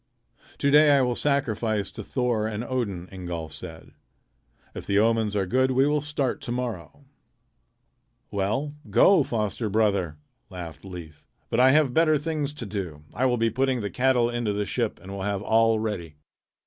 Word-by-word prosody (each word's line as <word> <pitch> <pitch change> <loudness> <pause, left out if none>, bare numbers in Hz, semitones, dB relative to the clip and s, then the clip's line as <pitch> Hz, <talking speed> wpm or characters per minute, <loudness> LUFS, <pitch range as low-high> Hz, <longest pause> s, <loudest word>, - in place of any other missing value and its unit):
"To 140 - +1
day 150 +1 +7
I - - +4
will 125 -1 +1
sacrifice 115 -7 0
to 110 - -8
Thor 120 -2 0
and 110 +1 -4
Odin," 105 -9 -3
Ingolf 85 -4 -6
said. 80 +1 -9 0.8
"If - - -8
the 100 - +2
omens 110 -1 +2
are 100 -2 +1
good 130 +8 +2
we 130 +1 +3
will 150 0 +1
start 145 -3 -2
to - - -5
morrow." 120 - -5 1.3
"Well, 110 +9 -1 0.2
go, 195 -4 +6
foster 110 -3 -2
brother," 100 -7 +1 0.3
laughed 85 -4 -8
Leif. 85 -5 -10 0.3
"But 115 - +1
I 130 +1 +7
have 150 -4 +3
better 155 0 +4
things 150 -1 -3
to 125 - -5
do. 95 -8 -5
I 130 - 0
will 125 -1 +1
be 115 0 +1
putting 130 +1 0
the 100 - -4
cattle 125 -2 +2
into 120 -3 -1
the 105 0 -1
ship 115 +1 -2
and 95 - -10
will 100 -1 -5
have 100 0 -2
all 115 +1 +3
ready." 100 -8 -4
110 Hz, 175 wpm, -25 LUFS, 100-130 Hz, 1.3 s, day